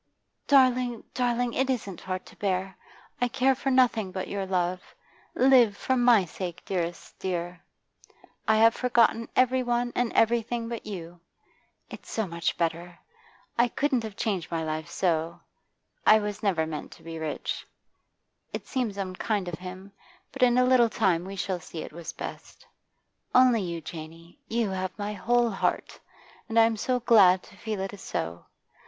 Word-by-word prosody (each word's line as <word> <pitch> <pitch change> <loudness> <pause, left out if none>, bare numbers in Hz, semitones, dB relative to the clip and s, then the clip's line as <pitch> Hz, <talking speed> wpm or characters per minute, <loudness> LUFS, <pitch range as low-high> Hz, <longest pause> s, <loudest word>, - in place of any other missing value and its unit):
'Darling, 255 -4 +3
darling, 245 -1 0
it 265 0 0
isn't 205 -8 -3
hard 185 0 -4
to - - -15
bear. 190 -1 -1 0.5
I 245 - +3
care 270 +1 +2
for 270 +1 -2
nothing 240 -6 +3
but 185 0 -4
your 195 -1 -3
love. 180 -1 -2 0.4
Live 245 -5 +5
for 260 - 0
my 240 -6 +5
sake, 175 0 -6
dearest 175 -2 -4
dear; 175 -1 -3 0.9
I 220 - +5
have 225 +1 +6
forgotten 235 -2 +2
every 255 0 +3
one 240 0 -1
and 245 -1 +1
everything 230 0 +1
but 235 -1 -6
you. 175 -4 -7 0.7
It's - - -10
so 220 - -1
much 170 -2 -2
better. 170 +1 -2 0.6
I 240 - +5
couldn't 265 0 0
have 220 -3 -7
changed 195 -7 -2
my 165 -1 -2
life 155 +1 -4
so; 165 -2 -1 0.6
I 215 - +7
was 210 -1 -3
never 185 -7 +1
meant 155 -1 -6
to 165 - -18
be 165 0 -7
rich. 155 -1 -4 0.9
It - - -5
seems 240 -7 -2
unkind 195 +1 -2
of 170 -2 -5
him, 185 +2 -9 0.4
but 270 - -8
in 245 -1 +5
a 250 - +5
little 250 -2 +5
time 185 -6 +1
we 195 +1 -7
shall 190 -1 -2
see 160 -1 -7
it - - -10
was 165 0 -7
best. - - -9 0.7
Only 250 -3 +6
you, 170 -3 -4
Janey; 165 - -10
you 225 -3 0
have 185 0 -3
my 205 0 -3
whole 235 +4 +2
heart, 195 - -2 0.5
and 230 0 +3
I'm 225 0 +5
so 250 +3 -1
glad 190 -6 +6
to - - -16
feel 215 0 -4
it 195 +1 -4
is 200 - -10
so. 85 +1 -4
205 Hz, 165 wpm, -27 LUFS, 175-240 Hz, 0.9 s, I